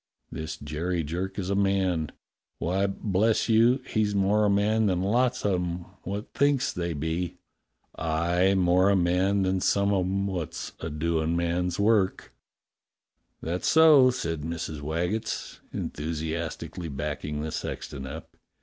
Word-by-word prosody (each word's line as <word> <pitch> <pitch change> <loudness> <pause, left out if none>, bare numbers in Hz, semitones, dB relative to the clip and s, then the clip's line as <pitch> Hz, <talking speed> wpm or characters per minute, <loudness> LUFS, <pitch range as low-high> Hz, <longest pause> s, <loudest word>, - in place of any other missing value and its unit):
This 80 0 -5
Jerry 80 +4 -2
Jerk 90 +7 -4
is 95 -1 -2
a - - +1
man; 95 -5 +1 0.5
why, 95 +3 0
bless 105 +2 +1
you, 120 +3 +4
he's 105 -2 0
more 100 +2 +3
a - - +3
man 105 +2 +2
than 90 -1 +1
lots 125 +5 +1
of 95 -3 +2
'em 85 0 -4 0.2
what 100 +3 -5
thinks 140 -2 +2
they 85 -1 -2
be. 80 +4 -3 0.6
Aye, 85 +4 +1
more 90 +1 +4
a 100 - +4
man 95 +2 +2
than 95 0 0
some 100 +2 +2
of 95 -2 +2
'em 100 +1 0
wot's 90 -6 -4
a 80 - -4
doin' 80 +1 0
man's 85 +1 -1
work." 100 -2 +2 1.1
"That's 85 +3 -2
so," 155 -5 +7
said 85 -11 -2
Mrs. 80 -1 -4
Waggetts, 90 +9 -3
enthusiastically 80 +2 -4
backing 75 +1 -4
the 80 - -4
sexton 65 -2 -5
up. - - -9
90 Hz, 140 wpm, -27 LUFS, 80-100 Hz, 1.1 s, so